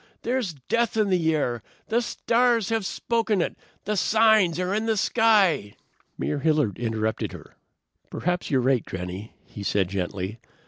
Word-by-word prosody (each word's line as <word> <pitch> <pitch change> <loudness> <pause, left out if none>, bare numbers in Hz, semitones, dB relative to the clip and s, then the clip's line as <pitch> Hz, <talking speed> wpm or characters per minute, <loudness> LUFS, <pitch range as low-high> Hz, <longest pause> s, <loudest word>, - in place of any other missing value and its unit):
There's 235 -8 -1
death 230 +1 +1
in 215 -2 +2
the 160 -3 +2
air. 120 -6 -1 0.3
The 235 +2 +2
stars 235 -2 +1
have 225 -4 0
spoken 225 -3 0
it. 170 - -1 0.3
The 210 +1 -1
signs 215 -4 +4
are 180 +1 -1
in 220 +2 -1
the 220 -1 +1
sky." 200 - +3 0.4
Mayor 150 - -2
Hilliard 150 - +1
interrupted 110 -2 -2
her. - - -12 0.6
"Perhaps 180 +1 -2
you're 130 -2 +2
right, 130 -2 +2
Granny," 95 +3 -6
he 105 - -10
said 100 -2 0
gently. 95 +2 -4
180 Hz, 150 wpm, -25 LUFS, -, 0.6 s, signs